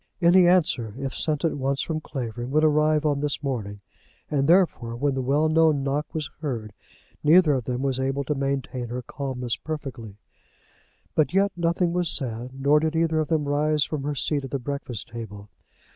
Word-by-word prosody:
Any 175 +1 +6
answer, 150 - +2
if 135 -1 -4
sent 155 0 0
at 165 - 0
once 135 +1 0
from 155 -1 -3
Clavering, 120 -4 -5
would 155 +3 +2
arrive 155 0 +3
on 145 -2 +1
this 145 +1 -1
morning; 105 -7 -4 0.5
and 140 -2 +1
therefore, 165 -10 +3
when 140 +3 0
the 135 - -1
well 145 +5 +2
known 155 -3 +3
knock 140 +2 -2
was 155 -4 -4
heard, 120 -9 -4 0.5
neither 155 0 +6
of 130 -4 -1
them 125 +1 -2
was 135 -2 0
able 135 +1 -1
to 145 - -1
maintain 135 -3 -2
her 125 +2 -5
calmness 125 -2 -4
perfectly. 135 -9 -6 1.0
But 155 +3 +1
yet 200 +1 +3
nothing 170 0 0
was 175 -2 0
said, 125 -1 -3
nor 145 +2 +4
did 160 +1 -1
either 160 -1 +2
of 155 - 0
them 155 -2 0
rise 150 +1 +2
from 150 +1 -3
her 145 +1 -3
seat 145 +1 0
at 135 - -6
the 140 - -1
breakfast 130 -4 -5
table. 110 -3 -8
140 Hz, 190 wpm, -25 LUFS, 130-155 Hz, 1.0 s, Any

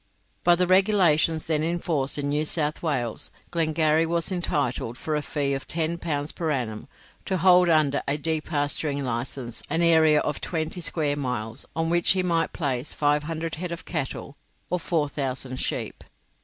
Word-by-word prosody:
By 175 - +6
the 180 +1 +2
regulations 180 -5 +3
then 155 -2 0
in 170 +2 0
force 145 -6 -1
in 145 -1 -1
New 150 +1 +1
South 150 -1 -1
Wales, 130 -9 -1 0.2
Glengarry 160 -1 +2
was 170 +2 0
entitled, 140 -9 -1
for 155 - -2
a 150 - 0
fee 145 -2 -1
of 135 - -4
10 165 +1 -1
pounds 150 -3 -2
per 165 -2 -3
annum, 120 -7 -2 0.4
to 190 - 0
hold 180 0 +5
under 150 -3 +3
a 140 +2 +1
depasturing 150 -2 -1
license 120 0 -3
an 165 +1 +1
area 160 -2 +5
of 150 - -2
twenty 160 +1 -2
square 155 -3 0
miles, 125 -5 -3
on 165 0 0
which 175 +1 +4
he 185 -1 0
might 170 -2 +1
place 135 -3 -2
500 155 +2 0
head 180 -1 -3
of 170 - -6
cattle 140 -3 -4 0.3
or 180 - +1
4,000 140 -6 -2
sheep. - - -3
155 Hz, 165 wpm, -25 LUFS, 140-170 Hz, 0.4 s, By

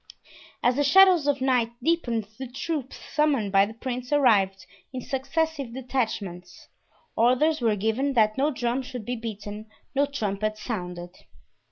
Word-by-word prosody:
As 245 +1 +3
the 290 - +3
shadows 355 +1 +6
of 280 -2 +1
night 250 -3 +2
deepened 245 -10 0
the 265 - -5
troops 270 +2 -4 0.2
summoned 285 -10 +2
by 195 0 +5
the 220 - -10
prince 250 +1 -5
arrived 205 -9 +3 0.3
in 260 - -5
successive 275 -1 -2
detachments. 220 -9 -4 0.5
Orders 255 +6 +3
were 225 -3 +2
given 225 +7 0
that 215 -3 +3
no 280 +3 +2
drum 245 -2 -1
should 250 -4 -7
be 245 - -2
beaten, 215 -2 -7 0.3
no 280 +1 +2
trumpet 215 -6 -2
sounded. 180 -5 -5
245 Hz, 145 wpm, -26 LUFS, 215-280 Hz, 0.5 s, shadows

